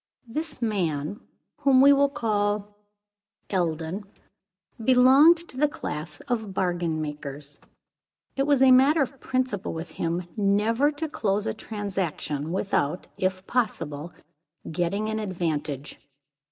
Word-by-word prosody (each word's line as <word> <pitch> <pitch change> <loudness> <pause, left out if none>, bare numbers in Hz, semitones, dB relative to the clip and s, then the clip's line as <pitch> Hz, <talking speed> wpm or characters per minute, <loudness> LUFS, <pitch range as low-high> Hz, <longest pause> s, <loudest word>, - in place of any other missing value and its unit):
This 300 +2 -4
man, 180 -4 -1 0.4
whom 275 -3 +4
we 280 +2 +8
will 280 0 +4
call 210 -5 -1 0.8
Eldon, 170 +1 -1 0.8
belonged 270 +8 +6
to 255 - -12
the 300 +2 +4
class 155 - -6
of 220 -5 -3
bargain 175 -4 0
makers. 145 -1 -7 0.8
It 275 +1 0
was 280 -2 +4
a 265 - +7
matter 275 +4 +6
of 270 0 -7
principle 255 -6 -2
with 165 0 -6
him 170 +2 -2
never 220 +7 +2
to 305 +2 -4
close 210 -8 -1
a 220 - -1
transaction 190 -9 -4
without, 180 -3 -1
if 185 0 -2
possible, 170 - -2 0.6
getting 175 +6 -1
an 220 0 -2
advantage. 155 -8 -3
205 Hz, 120 wpm, -26 LUFS, 165-255 Hz, 0.8 s, we